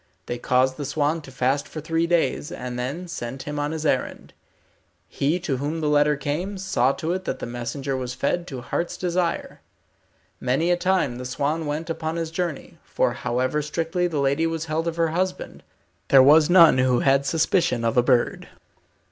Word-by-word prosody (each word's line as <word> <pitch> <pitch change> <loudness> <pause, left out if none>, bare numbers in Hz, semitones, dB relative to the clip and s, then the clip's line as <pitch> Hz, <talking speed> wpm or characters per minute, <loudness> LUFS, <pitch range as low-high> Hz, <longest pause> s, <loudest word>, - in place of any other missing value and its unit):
They 120 - -4
caused 130 +1 +2
the 145 - -4
swan 150 +3 0
to 135 - -12
fast 130 +2 0
for 155 - -7
three 165 +2 0
days, 170 -3 0
and 125 0 -5
then 145 +9 -4
sent 130 -5 -6
him 150 0 -4
on 145 0 -1
his 160 -1 -4
errand. - - -1 0.7
He 150 +6 0
to 140 -6 -1
whom 145 +5 -3
the 150 -2 0
letter 150 0 +3
came, 160 +8 -3
saw 135 -9 +1
to 160 +4 -2
it 185 0 -4
that - - -2
the - - -6
messenger 120 +3 -4
was 125 -1 -4
fed 175 +6 -1
to 130 -3 -6
heart's 170 +7 -3
desire. 175 -1 -2 0.8
Many 135 +8 +1
a - - +4
time 175 -9 0
the 125 - -6
swan 145 +5 -2
went 150 +3 -3
upon 160 -1 -3
his 165 -1 -3
journey, 170 -3 -4
for - - 0
however 130 +4 -1
strictly 165 +4 -1
the 165 -3 -3
lady 140 +4 +1
was 165 -1 -3
held 160 +1 -2
of 165 - -2
her 165 -1 +1
husband, 185 +3 -3 0.5
there 135 -1 +7
was 150 +3 +6
none 170 -7 +7
who 130 -1 +3
had 135 0 +3
suspicion 160 -7 +1
of 115 - +1
a 125 - +6
bird. 125 -1 +1
150 Hz, 190 wpm, -24 LUFS, 130-165 Hz, 0.8 s, there